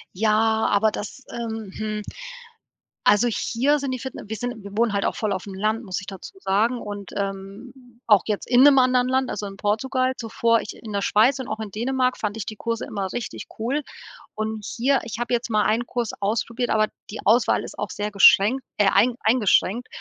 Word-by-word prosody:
Ja, 220 +2 +2
aber 215 +1 +3
das 240 +6 -7
ähm, 225 -3 -5
hm 215 -1 -3 1.1
also 210 +4 +4
hier 265 +6 +1
sind 275 -1 -3
die 255 - -3
Fitne 265 +2 -7
wir 220 - -4
sind 240 -2 -5
wir 200 - -8
wohnen 235 -1 +3
halt 200 -1 0
auch - - 0
voll 215 -2 -1
auf'm 190 0 -4
Land, 215 +3 0
muss 185 -2 -3
ich 190 - -12
dazu 195 - -9
sagen 220 +6 +1
und, 205 -2 -7
ähm, 195 +4 -5 0.3
auch 210 -4 +5
jetzt 210 -2 -3
in 245 +1 +6
'nem 285 -1 +7
anderen 255 -1 +3
Land, 260 0 +1
also 205 0 -4
in 195 -1 -7
Portugal 255 +6 0
zuvor 230 0 +1
ich - - -7
in 220 - -10
der 200 -1 -1
Schweiz 230 +7 +3
und 260 - -5
auch 215 +1 -4
in 210 - -6
Dänemark 255 +4 0
fand 210 -1 -3
ich 220 -2 -5
die 215 - -7
Kurse 230 +1 -3
immer 195 -3 -4
richtig 240 - -5
cool. 255 +7 -1 0.5
Und 215 -1 -4
hier, 265 +3 +1
ich 225 0 -6
habe 240 +1 -2
jetzt 240 0 0
mal 215 -2 +2
einen 225 +4 +1
Kurs 240 -2 -2
ausprobiert, 230 +4 -1
aber 215 -1 +3 0.2
die 215 - -6
Auswahl 230 +1 +3
ist - - -9
auch 210 - -2
sehr 210 +1 -3
geschränkt 205 +5 +6 0.2
äh, 205 -2 +4
ein 245 +2 +3
eingeschränkt. 225 0 +2
220 Hz, 205 wpm, -23 LUFS, 205-245 Hz, 1.1 s, nem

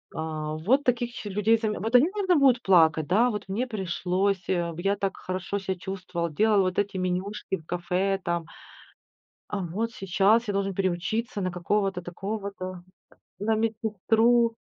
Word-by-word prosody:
А, 155 -1 -3
вот 230 - +2
таких 240 -1 +1
еще 210 - -7
людей 210 +3 +3
заме 215 -1 -2
Вот 225 +6 -1
они, 290 +8 +6
наверно, 375 -3 +2
будут 260 -4 +4
плакать, 160 -4 +4
да: 220 +7 +4
"Вот 210 -4 -5
мне 235 +7 -1
пришлось, 190 -2 -1
я 175 +2 0
так 195 -1 -2
хорошо 185 +2 -3
ся 190 -1 -3
чувствовал, 180 -2 -4
делал 210 +4 +3
вот 185 -1 0
эти 205 -1 -1
менюшки 185 +2 -2
в 160 - -17
кафе 180 +3 -1
там, 170 -1 -1 1.0
а 205 - -3
вот 205 +7 -3
сейчас 195 +5 +2
я 205 - -1
должен 195 0 -1
переучиться 195 +5 -1
на 185 - -1
какого-то 190 +2 -1
такого-то, 185 0 -5 0.6
на 220 +1 +1
медсестру". 225 +1 +2
195 Hz, 155 wpm, -26 LUFS, 180-220 Hz, 1.0 s, они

